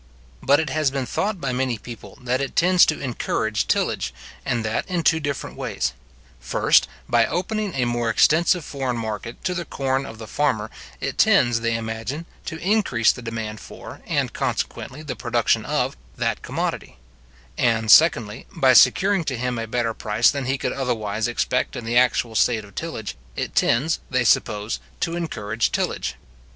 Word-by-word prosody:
But 140 Hz, +1 st, +4 dB
it 160 Hz, -, -2 dB
has 155 Hz, -2 st, +2 dB
been 135 Hz, -1 st, -2 dB
thought 205 Hz, -, -2 dB
by 135 Hz, -4 st, -2 dB
many 125 Hz, -2 st, 0 dB
people, 115 Hz, +1 st, -11 dB
that 125 Hz, +2 st, 0 dB
it 135 Hz, -, -4 dB
tends 180 Hz, +1 st, +5 dB
to 155 Hz, -, 0 dB
encourage 110 Hz, -4 st, -1 dB
tillage, -, -, 0 dB, 0.3 s
and 115 Hz, -2 st, -1 dB
that 110 Hz, +2 st, -1 dB
in 175 Hz, -2 st, -1 dB
two 160 Hz, 0 st, +4 dB
different 145 Hz, -3 st, -4 dB
ways; -, -, -2 dB, 0.5 s
first, -, -, +3 dB, 0.2 s
by 115 Hz, -1 st, +3 dB
opening 205 Hz, +2 st, -2 dB
a 125 Hz, -2 st, +1 dB
more 120 Hz, -1 st, 0 dB
extensive 165 Hz, -, +3 dB
foreign 130 Hz, -4 st, -3 dB
market 110 Hz, 0 st, -5 dB
to 185 Hz, -, 0 dB
the 175 Hz, -1 st, -3 dB
corn 135 Hz, -3 st, -2 dB
of 110 Hz, -, -9 dB
the 110 Hz, -, -8 dB
farmer, 110 Hz, -5 st, -1 dB, 0.3 s
it -, -, -4 dB
tends, 120 Hz, -2 st, +4 dB
they 115 Hz, 0 st, 0 dB
imagine, 115 Hz, +7 st, -4 dB, 0.2 s
to 160 Hz, -, -5 dB
increase 175 Hz, -, +2 dB
the -, -, -8 dB
demand 110 Hz, -2 st, -5 dB
for, -, -, -11 dB
and -, -, 0 dB
consequently 145 Hz, +4 st, -3 dB
the 135 Hz, -4 st, -5 dB
production -, -, +1 dB
of, -, -, 0 dB, 0.2 s
that -, -, -1 dB
commodity; -, -, -4 dB, 0.6 s
and, 115 Hz, -2 st, +2 dB
secondly 115 Hz, -10 st, +5 dB
by 130 Hz, -1 st, +5 dB
securing 185 Hz, -, +5 dB
to 130 Hz, -4 st, -2 dB
him 125 Hz, 0 st, -2 dB
a 115 Hz, -, -4 dB
better 115 Hz, 0 st, -1 dB
price 110 Hz, +1 st, +2 dB
than 140 Hz, -2 st, -3 dB
he 135 Hz, +2 st, 0 dB
could -, -, -2 dB
otherwise 110 Hz, -5 st, -1 dB
expect 125 Hz, +1 st, -1 dB
in 115 Hz, -, -6 dB
the 115 Hz, +1 st, -2 dB
actual 125 Hz, -2 st, +3 dB
state 110 Hz, -1 st, +2 dB
of 100 Hz, -, -16 dB
tillage, 160 Hz, -10 st, -5 dB, 0.2 s
it -, -, -3 dB
tends, 140 Hz, +8 st, +2 dB
they 130 Hz, -1 st, +1 dB
suppose, 105 Hz, -2 st, +1 dB, 0.2 s
to 170 Hz, 0 st, -1 dB
encourage 115 Hz, -10 st, -2 dB
tillage. -, -, -2 dB
125 Hz, 175 wpm, -23 LUFS, 115-150 Hz, 0.6 s, tends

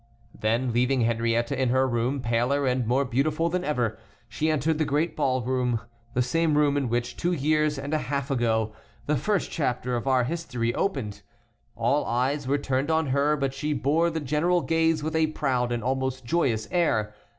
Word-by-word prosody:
Then, 115 Hz, +3 st, 0 dB
leaving 125 Hz, +2 st, +2 dB
Henriette 115 Hz, +1 st, +1 dB
in 130 Hz, -2 st, +1 dB
her 130 Hz, +2 st, +3 dB
room, 125 Hz, +3 st, -1 dB
paler 120 Hz, +4 st, +1 dB
and 125 Hz, -2 st, 0 dB
more 130 Hz, +4 st, +2 dB
beautiful 150 Hz, +6 st, 0 dB
than 180 Hz, +1 st, -1 dB
ever, 125 Hz, -9 st, -1 dB, 0.3 s
she 155 Hz, -, -1 dB
entered 155 Hz, +1 st, +1 dB
the -, -, +3 dB
great 155 Hz, +3 st, 0 dB
ballroom, 130 Hz, -2 st, 0 dB, 0.4 s
the 125 Hz, -, +3 dB
same 155 Hz, +4 st, +1 dB
room 145 Hz, -1 st, +3 dB
in 140 Hz, -4 st, 0 dB
which, 120 Hz, +1 st, -1 dB
two 175 Hz, +1 st, 0 dB
years 150 Hz, -1 st, +1 dB
and 140 Hz, +2 st, -4 dB
a 155 Hz, -, +2 dB
half 140 Hz, -1 st, -3 dB
ago, 110 Hz, -4 st, +1 dB, 0.3 s
the 150 Hz, -, +1 dB
first 195 Hz, -, 0 dB
chapter 125 Hz, -4 st, -1 dB
of 120 Hz, +3 st, -3 dB
our 130 Hz, -2 st, +3 dB
history 125 Hz, -5 st, -2 dB
opened. 130 Hz, -, -2 dB, 0.5 s
All 145 Hz, +1 st, +1 dB
eyes 130 Hz, +4 st, 0 dB
were 140 Hz, +2 st, +2 dB
turned 135 Hz, +1 st, -1 dB
on 160 Hz, -2 st, +1 dB
her, 140 Hz, +3 st, +2 dB
but 135 Hz, -1 st, -1 dB
she 150 Hz, +2 st, -2 dB
bore 150 Hz, +5 st, +2 dB
the 165 Hz, -1 st, -3 dB
general 155 Hz, +5 st, +1 dB
gaze 165 Hz, -2 st, +1 dB
with 160 Hz, +1 st, -2 dB
a 160 Hz, -1 st, +3 dB
proud 130 Hz, -5 st, -1 dB
and 120 Hz, -2 st, -2 dB
almost 130 Hz, 0 st, -2 dB
joyous 115 Hz, -7 st, 0 dB
air. 115 Hz, -, +1 dB
135 Hz, 185 wpm, -26 LUFS, 120-155 Hz, 0.5 s, her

